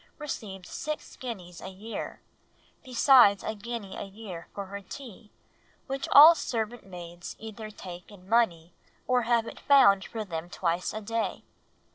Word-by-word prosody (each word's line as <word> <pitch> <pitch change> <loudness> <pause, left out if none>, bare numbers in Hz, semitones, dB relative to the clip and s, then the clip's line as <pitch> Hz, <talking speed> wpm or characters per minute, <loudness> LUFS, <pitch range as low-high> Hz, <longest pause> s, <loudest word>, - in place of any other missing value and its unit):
[received] 205 - -6
six 305 +9 -5
guineas 185 -9 -7
a - - -7
year, 210 +4 -7 0.6
besides 250 -5 +6
a 220 - -2
guinea 215 -2 -6
a - - -5
year 195 -4 -9
for 200 - -6
her 200 +1 -7
tea, 225 0 -11 0.5
which 270 0 -4
all 310 +4 +11
servant 235 -6 -3
maids 175 -2 -9
either 220 0 -8
take 180 -4 -10
in 195 -3 -15
money, 180 -7 +1 0.3
or 250 -1 +3
have 235 -2 +3
it - - -9
found 245 -9 +6
for 220 0 -5
them 170 -2 -5
twice 175 0 -1
a 215 - -5
day. 225 +2 -2
210 Hz, 150 wpm, -28 LUFS, 185-235 Hz, 0.6 s, all